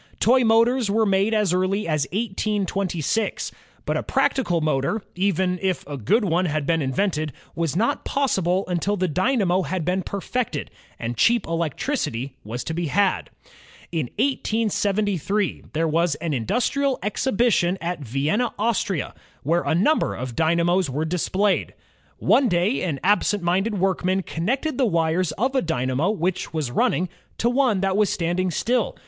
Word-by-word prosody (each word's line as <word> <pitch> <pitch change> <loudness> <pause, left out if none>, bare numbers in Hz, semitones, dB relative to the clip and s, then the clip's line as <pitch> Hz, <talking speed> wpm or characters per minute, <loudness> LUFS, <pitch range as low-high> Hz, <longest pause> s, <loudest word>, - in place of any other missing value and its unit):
Toy 250 +3 +4
motors 230 +1 +3
were 220 +2 +2
made 195 +1 +2
as 210 -5 +2
early 185 +3 0
as 155 -4 0
1826. 200 - -1 0.3
But - - 0
a - - -1
practical 175 -11 +1
©lotor, 155 +7 0
even 185 -1 0
if 190 -2 -1
a 145 - -6
good 205 - +1
one 180 0 +1
had 155 -3 -1
been 165 +1 +1
invented, 155 +3 -1 0.2
was 165 -3 -2
not 220 +6 +1
possible 190 -9 0
imtil 185 +3 0
the 185 0 +1
dynamo 185 - +1
had 180 0 -3
been 180 +2 +1
perfected, 200 - -3 0.3
and 115 0 -4
cheap 235 - +3
electricity 155 - -2
was 115 +4 -5
to 160 - -4
be 170 0 -2
had. 195 +5 +1 0.6
In 160 -7 -1
1873 210 - 0
there 165 +1 +1
was 165 0 +1
an 160 +1 -3
Industrial 250 - 0
Exhibition 205 -4 +1
at 175 0 -3
Vienna, 145 - -1
Austria, 205 - -1 0.3
where 170 +5 +2
a - - 0
number 255 - +2
of 125 -1 -5
d3niamos 170 +1 +2
were 150 +4 -2
displayed. 185 +4 0 0.4
One 270 -3 +3
day 180 +8 +1
an 155 -7 -2
absent 205 0 +2
minded 195 +5 +1
workman 190 0 +1
connected 255 - -2
the 260 - +4
wires 165 -1 +1
of 260 +5 -1
a 265 - +2
dynamo 135 +1 0
which 185 -3 -1
was 150 -6 -2
running, 180 +8 +1 0.3
to 235 - +1
one 245 -7 +2
that 195 -1 +1
was 210 -1 +3
standing 175 +2 0
still. 230 +6 0
185 Hz, 155 wpm, -23 LUFS, 165-215 Hz, 0.6 s, Toy